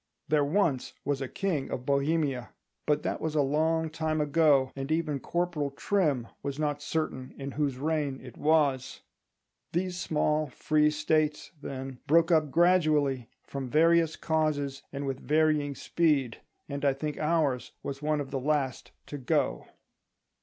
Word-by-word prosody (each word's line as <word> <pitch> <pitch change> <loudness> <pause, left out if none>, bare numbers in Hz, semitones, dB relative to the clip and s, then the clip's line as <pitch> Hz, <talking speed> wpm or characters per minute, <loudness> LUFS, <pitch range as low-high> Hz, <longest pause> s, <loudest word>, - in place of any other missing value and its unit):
"There 150 -2 +3
once 150 -4 +1
was 140 -1 -1
a 135 - -2
king 165 -3 -2
of 125 - -4
Bohemia"—but 140 0 -1
that - - -2
was 160 -1 -2
a 145 - +4
long 160 +3 +1
time 160 -1 -1
ago, 150 -3 +3
and 135 +2 -4
even 155 -3 0
Corporal 170 -2 -1
Trim 140 - 0
was 140 -1 -4
not 145 -1 -1
certain 145 -4 -3
in 140 0 -5
whose 140 -2 -1
reign 145 -2 -1
it 125 -3 -11
was. 145 -4 +1 0.7
These 180 +1 -1
small 150 -2 +1
free 150 +3 +2
States, 155 0 0
then, 135 -2 -6
broke 165 +2 +4
up 155 -3 +4
gradually, 150 -7 +3
from 135 -2 -5
various 165 +2 +4
causes 150 -4 -1
and 140 0 -4
with 135 -1 -3
varying 150 -2 +1
speed; 145 -9 0 0.3
and 140 -1 -5
I 140 -1 +4
think 150 +2 -4
ours 150 -5 0
was 140 0 -5
one 150 0 0
of 140 -2 -5
the 135 - -1
last 140 -1 -1 0.2
to 145 - -7
go. 115 - 0
150 Hz, 150 wpm, -29 LUFS, 135-160 Hz, 0.7 s, a